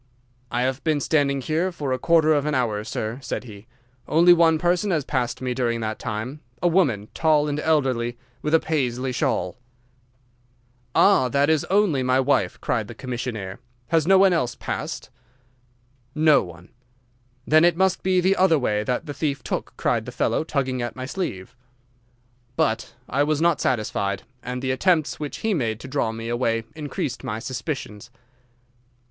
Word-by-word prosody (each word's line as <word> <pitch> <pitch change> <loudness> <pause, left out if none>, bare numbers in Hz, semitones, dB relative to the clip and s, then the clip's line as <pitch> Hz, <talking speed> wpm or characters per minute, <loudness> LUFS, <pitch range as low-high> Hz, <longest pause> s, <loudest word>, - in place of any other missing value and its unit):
"'I 120 +1 -1
have 130 +1 -2
been 155 -2 +1
standing 140 -2 +1
here 160 +7 0
for 145 -6 -3
a 130 - -2
quarter 160 +1 +4
of 145 0 +1
an 150 - 0
hour, 110 -5 0
sir,' 110 +2 -4
said 120 - -4
he; 105 -2 -12 0.4
'only 170 +3 +6
one 165 -2 +4
person 175 +5 +1
has 155 -7 0
passed 125 -4 -1
during 125 -2 -1
that 110 0 -3
time—a 125 +5 -4
woman, 140 - +2
tall 155 -2 +3
and 145 0 -2
elderly, 130 -7 +1 0.2
with 150 +2 +2
a - - +6
Paisley 130 -5 -1
shawl.' 90 -4 -1 1.4
"'Ah, 130 -1 +5
that 140 +4 +2
is 155 -2 +1
only 190 -8 +2
my 130 +1 +2
wife,' 130 -9 +1
cried - - -1
the - - -9
commissionnaire; 115 -6 -5 0.3
'has 165 -1 +2
no 190 0 +6
one 190 -1 +5
else 125 -8 0
passed?' - - -5 1.0
"'No 155 -1 +5
one.' 90 0 -11 0.8
"'Then 155 +1 +5
it 175 -1 +4
must 190 0 +2
be 185 -1 +2
the 190 +2 +3
other 185 -3 +4
way 105 -6 0
that 125 +8 -2
the 145 - -5
thief 140 -2 -2
took,' - - -3
cried - - 0
the - - -5
fellow, - - 0
tugging 130 -5 -1
at 120 - -4
my 130 - -5
sleeve. 125 - -5 1.0
"'But 115 0 -1
I 140 - 0
was 150 0 +1
not 170 -2 +2
satisfied, 100 -4 -1 0.2
and 125 +1 -5
the 130 - 0
attempts 155 +3 +1
which 150 -2 -5
he 220 - +2
made 115 - -1
to - - -8
draw 130 -4 -1
me 115 +1 -6
away 115 -1 0
increased 145 -4 -4
my 105 - -3
suspicions. 120 -2 -5
135 Hz, 170 wpm, -23 LUFS, 120-160 Hz, 1.4 s, only